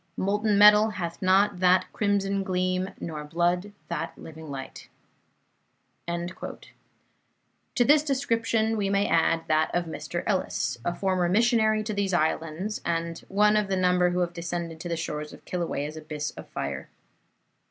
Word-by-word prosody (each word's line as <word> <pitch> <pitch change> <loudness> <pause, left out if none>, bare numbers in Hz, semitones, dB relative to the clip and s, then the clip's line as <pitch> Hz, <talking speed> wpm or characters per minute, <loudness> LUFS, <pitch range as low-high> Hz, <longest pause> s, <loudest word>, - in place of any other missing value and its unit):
Molten 205 +2 +1
metal 210 +1 +7
hath 175 -5 -5
not 190 0 +3
that 185 0 +4
crimson 200 -1 0
gleam, 185 0 -1
nor 155 -3 -5
blood 175 +5 0 0.2
that 170 -3 -4
living 160 -1 -10
light." 135 -1 -8 1.2
To 170 +2 -4 1.3
this 295 +3 +6
description 230 -6 0
we 200 -2 0
may 200 0 +2
add 165 0 +2
that 155 0 +2
of 175 0 +1
Mr. 160 - -5
Ellis, - - -1
a 175 - -1
former 185 -2 0
missionary 220 +1 +3
to 215 0 -3
these 200 -2 0
islands, 165 +5 -1
and 170 0 -2
one 210 +2 +4
of 210 -1 +2
the 190 -1 0
number 180 -1 +3
who 180 0 0
have 175 -1 -1
descended 170 -1 -4
to 175 - -6
the 170 - -1
shores 150 -2 -4
of - - -15
Kilauea's 155 -4 -3
abyss 155 -1 -5
of - - -11
fire. - - -5
180 Hz, 150 wpm, -26 LUFS, 165-205 Hz, 1.3 s, metal